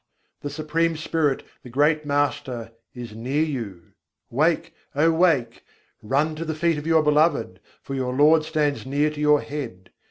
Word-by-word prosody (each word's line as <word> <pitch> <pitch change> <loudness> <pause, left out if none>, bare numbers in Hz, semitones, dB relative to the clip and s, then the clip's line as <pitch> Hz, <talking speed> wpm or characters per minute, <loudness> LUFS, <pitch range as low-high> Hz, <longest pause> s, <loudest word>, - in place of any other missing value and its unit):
the 145 - -5
Supreme 160 +2 -1
Spirit, 155 -3 0 0.2
the 125 - -12
great 150 +4 +2
Master, 140 -5 -1 0.2
is 120 -3 -8
near 130 +7 -1
you: 115 - -5 0.4
wake, 155 +6 +1 0.2
oh 160 +3 +4
wake! 160 -9 +1 0.4
Run 145 +8 0
to 165 - -3
the 160 -1 -3
feet 165 -1 +1
of 150 - -7
your 160 -1 +4
Beloved: 150 - +2 0.2
for 135 - -6
your 130 -1 -2
Lord 155 +3 +5
stands 155 -2 -1
near 145 +3 0
to 150 -1 -7
your 150 -1 +4
head. 120 -11 -7
150 Hz, 160 wpm, -24 LUFS, 130-155 Hz, 0.4 s, Lord